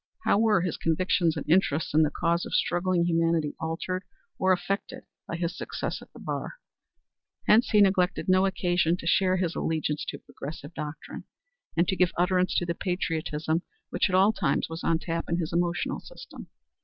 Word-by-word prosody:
How -, -, +3 dB
were 215 Hz, -5 st, +4 dB
his 180 Hz, -2 st, -2 dB
convictions 170 Hz, 0 st, +1 dB
and -, -, -5 dB
interest 160 Hz, -3 st, +2 dB
in 155 Hz, -, +5 dB
the 155 Hz, -, +3 dB
cause 170 Hz, +3 st, 0 dB
of -, -, -3 dB
struggling 175 Hz, 0 st, +1 dB
humanity 165 Hz, -3 st, +1 dB
altered 180 Hz, +3 st, -3 dB, 0.4 s
or 190 Hz, 0 st, +3 dB
affected 200 Hz, +7 st, -2 dB, 0.2 s
by -, -, -4 dB
his 170 Hz, +1 st, -2 dB
success -, -, -4 dB
at -, -, -15 dB
the -, -, -15 dB
bar? -, -, -4 dB, 0.9 s
Hence 225 Hz, +3 st, +5 dB
he 210 Hz, -, +5 dB
neglected 190 Hz, -2 st, +2 dB
no 185 Hz, +1 st, +4 dB
occasion 175 Hz, -2 st, +1 dB
to -, -, -9 dB
declare 185 Hz, +2 st, +3 dB
his 175 Hz, -2 st, -1 dB
allegiance 155 Hz, -2 st, -1 dB
to -, -, -5 dB
progressive 150 Hz, +2 st, -9 dB
doctrine, 150 Hz, -1 st, -7 dB, 0.5 s
and 170 Hz, +1 st, +3 dB
to 190 Hz, -, +1 dB
give 180 Hz, -2 st, +2 dB
utterance 180 Hz, +1 st, +2 dB
to 175 Hz, -, +1 dB
the 170 Hz, -, -1 dB
patriotism 165 Hz, -3 st, -2 dB, 0.3 s
which -, -, +1 dB
at 185 Hz, -, +1 dB
all 195 Hz, +4 st, +5 dB
times 145 Hz, -7 st, 0 dB
was 165 Hz, 0 st, -6 dB
on 165 Hz, -, +2 dB
tap 165 Hz, 0 st, -3 dB
in 170 Hz, -, +1 dB
his 165 Hz, -2 st, -3 dB
emotional 175 Hz, 0 st, 0 dB
system. -, -, -11 dB
175 Hz, 180 wpm, -27 LUFS, 165-185 Hz, 0.9 s, in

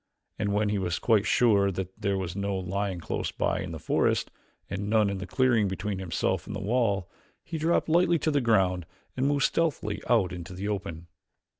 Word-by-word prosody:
And 105 Hz, -2 st, 0 dB
when 105 Hz, +1 st, +1 dB
he 105 Hz, -1 st, 0 dB
was 90 Hz, -3 st, -1 dB
quite 110 Hz, -2 st, +2 dB
sure 100 Hz, -5 st, +4 dB
that 95 Hz, 0 st, -4 dB
there 100 Hz, -2 st, +1 dB
was 95 Hz, -2 st, -4 dB
no 100 Hz, -1 st, -1 dB
lion 95 Hz, 0 st, -2 dB
close 80 Hz, -, -3 dB
by -, -, 0 dB
in -, -, -5 dB
the -, -, -5 dB
forest, -, -, +1 dB, 0.4 s
and 100 Hz, +1 st, -4 dB
none 105 Hz, -2 st, +3 dB
in 100 Hz, -, -4 dB
the 95 Hz, -, -6 dB
clearing 120 Hz, -2 st, +3 dB
between 95 Hz, +1 st, -3 dB
himself 95 Hz, -3 st, -1 dB
and -, -, -5 dB
the -, -, -3 dB
wall, 100 Hz, -4 st, +1 dB, 0.4 s
he 165 Hz, -1 st, -5 dB
dropped 165 Hz, +2 st, +2 dB
lightly 170 Hz, +1 st, +4 dB
to 155 Hz, -, 0 dB
the 145 Hz, -1 st, +2 dB
ground 95 Hz, -7 st, +2 dB, 0.3 s
and 130 Hz, +1 st, +1 dB
moved 145 Hz, -1 st, +2 dB
stealthily 155 Hz, -11 st, 0 dB
out 110 Hz, -7 st, +3 dB
into 90 Hz, 0 st, -7 dB
the 95 Hz, +3 st, -4 dB
open. 85 Hz, -5 st, -4 dB
100 Hz, 200 wpm, -28 LUFS, 95-115 Hz, 0.4 s, sure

